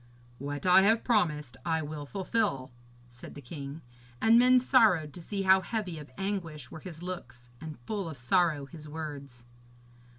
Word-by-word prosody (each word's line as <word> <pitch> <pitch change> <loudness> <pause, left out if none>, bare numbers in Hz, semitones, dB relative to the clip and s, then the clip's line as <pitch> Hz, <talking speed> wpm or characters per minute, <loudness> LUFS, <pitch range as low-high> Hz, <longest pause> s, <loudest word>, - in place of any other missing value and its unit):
'What 145 +4 -5
I 180 +1 +7
have 220 +3 +3
promised 150 - 0
I 160 -2 0
will 150 -1 -6
fulfil,' 190 - -1 0.4
said 120 - -11
the - - -8
king; 140 +2 -8 0.4
and 225 +1 +6
men 255 +1 +6
sorrowed 220 - +3
to 175 - -9
see 195 +3 -3
how 190 0 +6
heavy 190 -6 -4
of 150 - -11
anguish 170 -9 -4
were - - -8
his 170 -1 -9
looks, 130 -10 -8
and 155 -2 -7
full 200 -6 -3
of 155 - -8
sorrow 155 +2 +2
his 155 0 -11
words. 140 -6 -7
160 Hz, 165 wpm, -29 LUFS, 145-195 Hz, 0.4 s, I